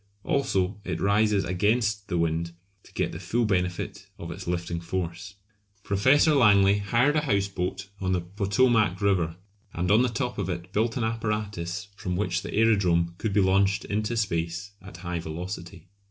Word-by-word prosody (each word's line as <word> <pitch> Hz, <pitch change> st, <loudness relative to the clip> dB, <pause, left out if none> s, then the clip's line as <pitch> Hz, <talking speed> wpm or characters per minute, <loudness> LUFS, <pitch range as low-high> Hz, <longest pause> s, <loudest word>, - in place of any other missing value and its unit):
Also 105 Hz, -, 0 dB
it 90 Hz, -4 st, -3 dB
rises 105 Hz, 0 st, +2 dB
against 105 Hz, +3 st, 0 dB
the 90 Hz, -4 st, -1 dB
wind 85 Hz, 0 st, -1 dB, 0.3 s
to -, -, -19 dB
get -, -, -1 dB
the -, -, -7 dB
full 120 Hz, 0 st, 0 dB
benefit 90 Hz, -3 st, -2 dB
of 85 Hz, -, -7 dB
its 95 Hz, +2 st, -8 dB
lifting 85 Hz, -1 st, -2 dB
force. 90 Hz, +2 st, -4 dB, 0.5 s
Professor 130 Hz, +10 st, +4 dB
Langley 100 Hz, -6 st, +5 dB
hired 115 Hz, +9 st, +2 dB
a -, -, +3 dB
houseboat 95 Hz, -, -1 dB
on 95 Hz, -1 st, -1 dB
the 90 Hz, -1 st, +1 dB
Potomac 100 Hz, +2 st, +2 dB
River, 90 Hz, -5 st, +1 dB, 0.4 s
and 90 Hz, +3 st, 0 dB
on 110 Hz, +3 st, +6 dB
the 125 Hz, -, +2 dB
top 120 Hz, +1 st, -3 dB
of 95 Hz, -2 st, -2 dB
it 90 Hz, +1 st, -5 dB
built 115 Hz, +3 st, +1 dB
an 120 Hz, -, -1 dB
apparatus 105 Hz, -5 st, -3 dB
from 90 Hz, -2 st, -3 dB
which 100 Hz, +4 st, -1 dB
the -, -, -7 dB
aerodrome 90 Hz, -6 st, +2 dB
could 110 Hz, -, -1 dB
be 100 Hz, +1 st, +3 dB
launched 95 Hz, +1 st, +2 dB
into 110 Hz, +3 st, -2 dB
space 85 Hz, -1 st, -2 dB
at 95 Hz, 0 st, -11 dB
high 90 Hz, -2 st, -4 dB
velocity. 85 Hz, +2 st, -7 dB
100 Hz, 170 wpm, -26 LUFS, 90-105 Hz, 0.5 s, on